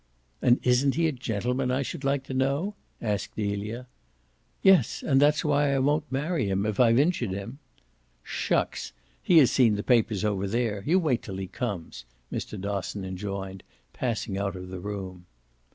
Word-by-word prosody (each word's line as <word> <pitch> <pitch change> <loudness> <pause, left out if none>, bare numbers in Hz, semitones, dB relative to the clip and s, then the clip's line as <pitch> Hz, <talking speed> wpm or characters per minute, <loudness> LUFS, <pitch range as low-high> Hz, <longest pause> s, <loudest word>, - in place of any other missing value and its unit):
"And 125 0 +4
isn't 125 +2 +3
he 165 0 +2
a - - +1
gentleman, 125 0 -2
I 130 +2 +1
should 135 - -6
like 135 0 +1
to 135 - -7
know?" 140 +9 0 0.3
asked 105 -3 -2
Delia. 105 +3 -3 0.8
"Yes, 190 -2 +4
and 135 -2 +4
that's 150 +3 +3
why 145 -1 +2
I - - +2
won't 145 +3 +1
marry 145 - 0
him 95 +1 0
if 105 -2 -2
I've 115 -2 +5
injured 145 - +2
him." 100 +8 -6 0.6
"Shucks! - - -1 0.3
he 175 - +4
has 140 -6 +7
seen 115 -5 +4
the 105 - -3
papers 110 -4 +2
over 100 -2 0
there. 110 -1 -1
You 175 +4 +4
wait 150 -10 +1
till 95 -3 -7
he 95 - -3
comes," 90 - -5 0.3
Mr. 105 - -4
Dosson 100 0 -3
enjoined, 95 0 -5 0.3
passing 110 -5 -2
out 100 -1 -2
of 90 0 -8
the 95 0 -6
room. 95 -2 -6
115 Hz, 170 wpm, -27 LUFS, 100-135 Hz, 0.8 s, has